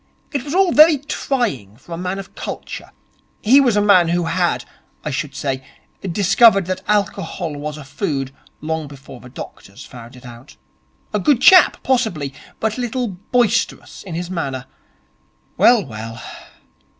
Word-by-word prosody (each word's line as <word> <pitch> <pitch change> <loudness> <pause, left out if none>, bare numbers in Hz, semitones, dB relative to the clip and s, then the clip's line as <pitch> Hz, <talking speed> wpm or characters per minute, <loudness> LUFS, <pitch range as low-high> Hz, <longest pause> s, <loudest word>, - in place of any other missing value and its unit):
It 280 - -1
was 295 +3 -4
all 380 -2 +4
very 310 0 +7
trying 235 - -3
for 135 +7 -18
a - - -2
man 180 +1 -3
of 195 0 -9
culture. - - -7 0.5
He 265 +6 +6
was 245 -6 +2
a 205 - +3
man 185 -5 +5
who 175 +1 +1
had, 170 +1 0 0.4
I 150 - -2
should 140 +1 -4
say, 135 -2 -3 0.4
discovered 195 +2 +4
that 185 +1 -3
alcohol 195 -5 -1
was 150 +1 -5
a 150 - -9
food 140 -2 -3 0.3
long 160 0 -3
before 135 -2 -12
the 125 - -13
doctors 120 -2 -10
found 120 -1 -12
it 125 - -14
out. 120 +3 -13 0.6
A - - +1
good 290 -6 +3
chap, 370 +6 +6
possibly, 220 - 0 0.3
but 220 +2 -1
a - - -1
little 245 0 -2
boisterous 225 +4 -1
in 180 -4 -7
his 175 +1 -4
manner. 135 -7 -3 0.9
Well, 235 -6 +5
well.' 115 -1 -8
175 Hz, 160 wpm, -19 LUFS, 140-230 Hz, 0.9 s, very